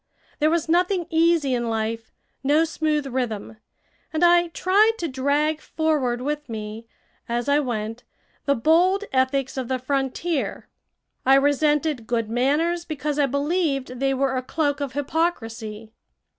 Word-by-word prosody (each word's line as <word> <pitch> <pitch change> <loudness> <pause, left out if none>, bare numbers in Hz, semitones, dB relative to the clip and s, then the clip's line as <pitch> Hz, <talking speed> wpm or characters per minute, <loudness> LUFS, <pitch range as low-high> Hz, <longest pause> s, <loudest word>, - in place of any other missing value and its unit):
There 305 0 +3
was 335 0 0
nothing 355 +2 +2
easy 325 -4 +3
in 240 -1 -1
life, 225 0 -3 0.3
no 295 +4 +4
smooth 310 -2 -1
rhythm. 240 -5 -3 0.5
And 315 +2 +2
I 345 0 +5
tried 395 +6 +3
to 340 - -2
drag 290 +3 0
forward 290 -7 0
with 295 0 -3
me, 220 +1 -6 0.4
as 240 +2 -1
I 285 +1 +4
went, 225 -3 -3 0.4
the 280 - +3
bold 345 - +3
ethics 265 +1 +1
of 255 -2 -2
the 260 - 0
frontier. 275 +4 -2 0.6
I 265 +1 +6
resented 290 -2 +2
good 230 -2 -1
manners 300 +8 +1
because 300 -2 -3
I 285 - +4
believed 280 -3 -1
they 270 0 +1
were 265 0 0
a 255 - 0
cloak 290 +2 -1
of 275 -2 -3
hypocrisy. 225 -8 -3
280 Hz, 145 wpm, -23 LUFS, 250-315 Hz, 0.6 s, I